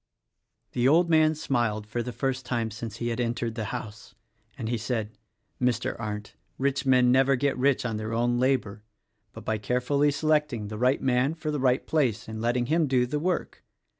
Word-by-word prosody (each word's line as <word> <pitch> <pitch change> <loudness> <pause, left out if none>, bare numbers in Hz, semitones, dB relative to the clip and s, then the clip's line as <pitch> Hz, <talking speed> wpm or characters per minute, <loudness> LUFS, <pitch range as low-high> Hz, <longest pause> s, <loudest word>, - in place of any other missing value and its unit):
The 125 +1 +1
old 170 +4 +4
man 155 0 +4
smiled 120 -7 -1
for 115 +3 -3
the 125 - -4
first 130 +2 -2
time 120 -3 -2
since 110 0 -6
he 120 0 -2
had 115 +1 -3
entered 120 -1 -1
the 115 -2 -4
house, 110 -2 -7 0.4
as 115 -5 -4
he 120 - 0
said, 110 -1 -2 0.5
"Mr. 125 -2 0
Arndt, 105 -2 -5 0.2
rich 135 0 0
men 125 -1 +5
never 135 +1 +4
get 140 +2 0
rich 130 0 +1
on 115 -3 -2
their 110 +1 -4
own 120 +1 +1
'labor, 125 -6 0 0.5
but - - -11
by 110 -1 -1
carefully 125 +7 +1
selecting 150 -7 0
the 105 - -5
right 130 +3 +2
man 130 +4 +2
for 155 -2 -3
the 150 - -2
right 130 -1 +2
place 130 -9 0
and 110 0 -6
letting 120 +1 +1
him 160 +3 +2
do 130 -2 +2
the 145 +4 -2
work. 180 +2 -2
125 Hz, 195 wpm, -27 LUFS, 115-135 Hz, 0.5 s, men